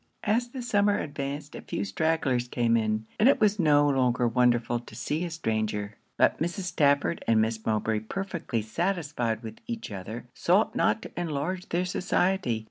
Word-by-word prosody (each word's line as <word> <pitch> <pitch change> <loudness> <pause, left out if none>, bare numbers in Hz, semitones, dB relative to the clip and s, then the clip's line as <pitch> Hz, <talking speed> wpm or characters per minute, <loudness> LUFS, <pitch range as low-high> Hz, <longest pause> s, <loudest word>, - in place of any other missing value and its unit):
As 230 +3 +1
the 255 0 -6
summer 205 -3 +2
advanced, 145 0 -4
a - - -7
few 100 - -3
stragglers 130 +2 0
came 120 -1 +1
in, 110 -1 0
and 230 - +6
it - - +4
was 210 -1 +3
no 145 -3 +5
longer 125 -3 +2
wonderful 120 0 +2
to 120 - -13
see 155 +4 -2
a - - -4
stranger. 110 -8 -2 0.2
But - - +3
Mrs. 175 +4 -2
Stafford 150 -3 +2
and 115 -1 +4
Miss 110 0 0
Mowbray, 110 0 0
perfectly 160 - -3
satisfied 140 - -1
with 110 -1 -8
each 230 - -5
other, 105 +5 -6
sought 185 +5 +2
not 225 - +2
to - - -8
enlarge 175 +2 -3
their 175 +2 0
society. 180 - 0
140 Hz, 170 wpm, -27 LUFS, 115-180 Hz, 0.2 s, and